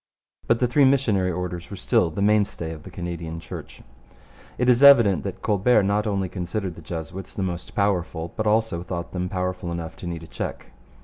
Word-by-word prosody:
But 115 - +4
the 125 - +3
three 130 +4 +3
missionary 115 -9 +3
orders 90 -1 -4
were 100 - -6
still 90 -2 +2
the 90 +5 -2
mainstay 100 -6 +1
of 80 -1 -8
the 95 - -11
Canadian 85 -2 -5
Church. - - -9 0.7
It 125 - +1
is 125 0 +5
evident 115 - +7
that - - -6
Colbert 105 +1 +3
not 105 +2 +1
only 100 -2 0
considered 90 +1 -4
the 85 - -12
Jesuits 85 +3 -7
the 95 - -2
most 90 -1 -5
powerful, 90 -5 -1
but 110 - -1
also 110 -5 +1
thought 85 0 -5
them 90 0 -3
powerful 90 -1 -3
enough 85 -1 -5
to 90 - -7
need 85 -1 -5
a - - -10
check. - - -6
90 Hz, 195 wpm, -24 LUFS, 85-105 Hz, 0.7 s, evident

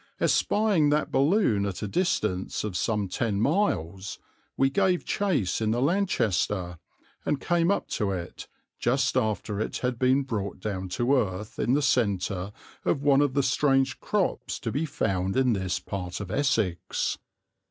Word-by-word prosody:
Espying 205 -8 +3
that 150 +1 +1
balloon 140 - +3
at 100 -1 -3
a - - -1
distance 105 - -1
of 105 -4 -4
some 105 +5 0
ten 100 +2 -1
miles, 100 - 0 0.4
we 135 - +4
gave 185 +4 +1
chase 165 - 0
in 110 - +1
the 115 +2 +1
Lanchester 105 - 0 0.4
and 145 - 0
came 170 +2 +1
up 200 - 0
to 105 - -1
it, 90 -2 -5 0.3
just 130 +2 +1
after 105 -1 -1
it 110 - -2
had 125 -2 -1
been 130 +2 +3
brought 105 -8 -4
down 95 -2 -4
to 120 +8 +1
earth 105 -4 -2
in 125 - +2
the 145 - +1
centre 100 -6 0 0.3
of 140 - 0
one 140 -1 +5
of 140 -2 +1
the 140 - +3
strange 135 -1 +2
crops - - -1
to - - -3
be 155 +5 -1
found 95 -6 -1
in 130 -2 +3
this 95 -2 -1
part 90 -1 -5
of 100 -2 -6
Essex. 110 - 0
115 Hz, 160 wpm, -27 LUFS, 95-140 Hz, 0.4 s, one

